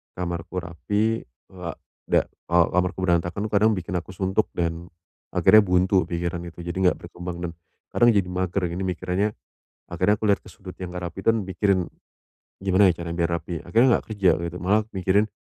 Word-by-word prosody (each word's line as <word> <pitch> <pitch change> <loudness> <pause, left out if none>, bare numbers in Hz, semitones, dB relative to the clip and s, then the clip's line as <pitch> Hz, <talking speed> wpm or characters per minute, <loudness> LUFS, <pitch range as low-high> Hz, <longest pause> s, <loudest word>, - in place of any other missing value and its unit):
kamarku 85 0 -4
rapi, 105 +6 -1 0.2
ha 90 -3 -6 0.3
dak - - +2 0.2
kalau 85 -1 +3
kamarku 90 +1 +1
berantakan, 90 +3 0
kadang 105 +1 +3
bikin 90 -2 -3
aku 90 +1 -3
suntuk, 95 +3 0
dan, 85 0 -3 0.4
akhirnya 110 0 +6
buntu 90 0 +3
pikiran 85 +1 -3
itu, 85 0 -10
jadi 85 0 -5
enggak 95 -1 +2
berkembang, 90 0 -7
dan, 85 -1 -3 0.4
kadang 120 0 +5
jadi 100 -5 +2
mager, 90 0 -1
ini 85 +3 -4
mikirannya. 90 +2 -1 0.6
Akhirnya, 105 +1 +1
aku 110 - 0
lihat 100 - +2
ke - - -13
sudut 95 -4 -11
yang 90 -1 -7
enggak 90 0 -4
rapi, 85 - -10
dan, 115 -1 +3
mikirin 95 -2 +1 0.8
"Gimana 95 +1 +5
ya, 85 -1 -2
caranya 85 0 -4
biar 85 - +2
rapi?" 85 +2 -7
Akhirnya, 115 +8 +3
enggak - - -10
kerja 100 -4 +2 0.3
malah 100 +5 +2
mikirin 95 +3 +2
90 Hz, 175 wpm, -24 LUFS, 85-100 Hz, 0.8 s, akhirnya